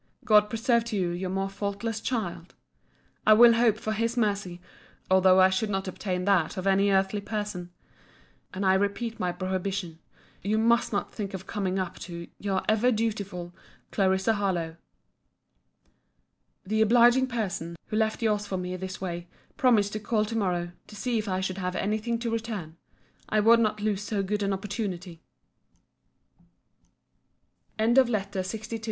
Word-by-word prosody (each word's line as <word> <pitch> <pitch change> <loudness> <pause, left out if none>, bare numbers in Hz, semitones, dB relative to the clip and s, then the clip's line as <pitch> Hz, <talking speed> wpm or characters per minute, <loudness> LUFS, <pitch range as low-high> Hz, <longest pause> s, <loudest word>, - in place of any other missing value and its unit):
God 210 -3 +5
preserve 235 +1 +2
to 230 -2 -4
you 180 -2 0
your 180 +2 -3
more 195 +1 -1
faultless 200 +3 -4
child! 195 -8 -3 0.7
I 215 - +9
will 235 +2 +8
hope 230 -2 +3
for 220 0 -3
His 230 +2 -1
mercy, 200 -5 -1 0.5
although 190 0 +6
I 185 0 +6
should 195 +3 0
not 195 -1 -2
obtain 180 -1 -3
that 195 -2 +2
of 185 - -4
any 195 +1 +3
earthly 195 +1 +1
person. 205 -4 -4 0.8
And 195 +1 -3
I 190 - +5
repeat 205 +4 -1
my 180 -2 0
prohibition:—You 185 +2 -4
must 235 +2 +3
not 200 - -2
think 200 -2 -4
of 190 0 -8
coming 195 -3 -2
up 185 -2 -3
to 170 -1 -7
Your 195 -2 -1
ever 220 +3 +3
dutiful 200 -6 -3 0.4
CL. 190 -2 +3 0.2
HARLOWE. 175 -6 -1 1.9
The 215 +3 0
obliging 240 +3 +5
person, 195 -8 -3
who - - -5
left 220 +1 0
your's 210 -2 +1
for 190 - -2
me 180 0 -4
this 190 0 -6
day, 175 -2 -5 0.3
promised 215 -6 +3
to 215 - -2
call 215 0 0
to 225 - -5
morrow, 175 -5 -1 0.2
to 210 - -12
see 230 +3 -1
if 215 -1 -4
I 185 0 -1
should 190 0 -3
have 180 0 -2
any 210 +3 0
thing 235 +2 -2
to 235 -1 -2
return. 215 -8 -4 0.5
I 215 - +2
would 230 +2 +6
not 215 -2 0
lose 210 -2 0
so 205 -1 -2
good 205 +2 -2
an 200 0 0
opportunity. 190 -4 -4 2.6
LETTER 235 +4 +5 0.3
LXIII - - +2
MRS. 220 +4 -5
200 Hz, 160 wpm, -27 LUFS, 185-220 Hz, 2.6 s, I